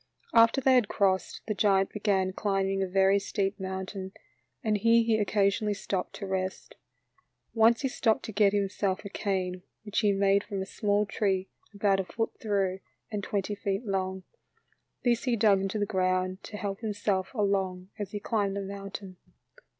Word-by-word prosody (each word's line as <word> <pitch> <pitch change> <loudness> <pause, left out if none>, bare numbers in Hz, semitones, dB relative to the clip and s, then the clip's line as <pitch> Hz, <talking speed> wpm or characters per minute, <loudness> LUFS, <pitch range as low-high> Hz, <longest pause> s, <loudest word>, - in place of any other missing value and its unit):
After 230 +4 +5
they 265 0 +4
had 245 -5 +4
crossed, 190 -2 0
the 215 - 0
giant 195 -2 +2
began 195 -3 0
climbing 195 -1 0
a 190 - 0
very 195 +1 +4
steep 195 0 -2
mountain, 190 0 -5 0.5
and 215 -2 +1
here 230 +2 +5
he 225 -1 +2
occasionally 205 0 +1
stopped 195 -1 -3
to 200 - -6
rest. 190 0 -3 0.8
Once 225 0 +4
he 270 - +1
stopped 235 -4 +1
to - - -5
get 205 -1 +4
himself 200 -1 -1
a - - -5
cane 185 -2 -2 0.2
which 210 -1 -1
he 210 -3 +3
made 200 0 +3
from 200 - -5
a 190 - -2
small 205 0 0
tree 195 -2 -1 0.2
about 200 -2 +2
a 190 - -1
foot 225 +4 -2
through 195 -3 0 0.3
and 205 -2 -3
twenty 200 +1 -2
feet 200 +2 -2
long; 190 -2 -2 0.8
this 240 0 +1
he 245 -2 +2
dug 205 -3 +4
into 195 +2 -2
the 205 - +1
ground 185 0 0
to 210 - -7
help 200 -1 -4
himself 205 -3 -1
along 190 -3 0
as 205 -3 -3
he 205 - -4
climbed 200 -2 -1
the 200 - -2
mountain. 195 -1 -7
200 Hz, 175 wpm, -29 LUFS, 190-210 Hz, 0.8 s, After